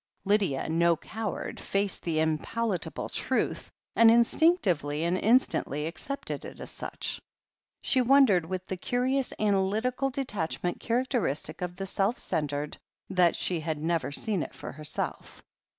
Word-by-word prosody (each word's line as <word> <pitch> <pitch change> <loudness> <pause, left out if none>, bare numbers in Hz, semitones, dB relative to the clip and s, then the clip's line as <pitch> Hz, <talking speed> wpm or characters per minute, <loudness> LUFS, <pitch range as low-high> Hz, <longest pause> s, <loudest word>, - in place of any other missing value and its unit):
Lydia, 200 -9 +1
no 170 +1 +3
coward, 215 +5 -5
faced 195 -1 0
the 165 -2 -1
unpalatable 170 +6 -1
truth, - - -1 0.3
and 230 -1 +7
instinctively 225 - +3
and 170 +2 +1
instantly 195 - +2
accepted 275 - -4
it - - -9
as - - -6
such. - - -4 0.6
She 260 - +3
wondered, 245 -10 +5
with 185 +1 -4
the 190 - -4
curious 255 +6 0
analytical 215 +6 +1
detach 210 -11 -3
ment 175 0 -1
characteristic 230 - -1
of 180 0 -3
the 195 +1 -4
self 195 +5 0
centred, 145 0 -2 0.3
that 180 -2 +4
she 175 -2 0
had 160 -1 -2
never 160 0 -1
seen 200 +4 -1
it - - -6
for - - -7
herself. 150 +1 -5
190 Hz, 135 wpm, -28 LUFS, 160-230 Hz, 0.6 s, and